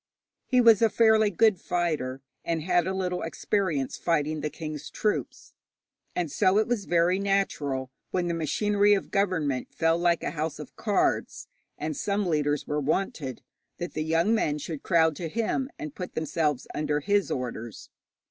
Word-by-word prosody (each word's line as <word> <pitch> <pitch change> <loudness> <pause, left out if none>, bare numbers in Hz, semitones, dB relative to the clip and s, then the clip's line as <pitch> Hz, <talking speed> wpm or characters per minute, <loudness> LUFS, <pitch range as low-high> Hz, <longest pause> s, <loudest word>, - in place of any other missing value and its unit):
He 255 - +3
was 230 -3 +6
a 225 - +5
fairly 220 -2 +4
good 210 0 +3
fighter, 155 -8 -2 0.2
and 165 -2 -1
had 175 0 +2
a 190 - -1
little 180 -1 -2
experience 165 -5 -1
fighting 155 -2 0
the 150 - -1
king's 155 -1 -6
troops; 210 - -2 0.6
and 170 -4 -1
so 185 +7 +3
it 215 - +3
was 235 -5 -1
very 175 +2 +2
natural, 150 -10 -1 0.2
when 180 -1 -1
the 170 - 0
machinery 205 +6 +2
of 195 - -4
government 165 -10 0
fell 165 0 +1
like 175 -1 +2
a - - -1
house 155 0 -3
of - - -10
cards, - - 0 0.3
and 155 0 -3
some 200 +4 -1
leaders 150 -4 0
were 150 0 -1
wanted, 145 -4 -2 0.3
that 175 0 -5
the 155 - -2
young 165 +7 +2
men 155 -10 +1
should 150 0 -6
crowd 160 -3 +3
to 170 -2 -4
him, 230 - -1
and 310 -3 -6
put 180 -8 -7
themselves 155 -3 -1
under 150 0 -1
his 200 +5 +1
orders. 120 -3 -5
170 Hz, 165 wpm, -27 LUFS, 150-200 Hz, 0.6 s, was